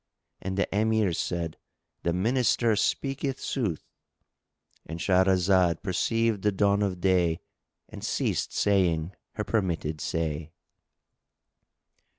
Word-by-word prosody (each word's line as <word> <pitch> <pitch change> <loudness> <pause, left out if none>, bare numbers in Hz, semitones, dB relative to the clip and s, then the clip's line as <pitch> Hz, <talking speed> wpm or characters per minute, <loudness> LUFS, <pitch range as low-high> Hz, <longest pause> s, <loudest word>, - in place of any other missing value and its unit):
And 95 +1 -4
the 100 - +2
Emirs 110 -4 +2
said, 85 -2 -2 0.4
"The 85 - 0
Minister 115 +3 +2
speaketh 135 +4 -1
sooth"!——And 85 - -7
Shahrazad 95 -2 +3
perceived 115 +2 +1
the 105 - +2
dawn 100 +1 +2
of 95 -3 -1
day 90 -3 +2 0.5
and - - -10
ceased - - -1
saying 90 -4 +1 0.2
her 105 - -2
permitted 85 -9 -1
say. 80 -1 -2
95 Hz, 100 wpm, -27 LUFS, 85-105 Hz, 0.5 s, Shahrazad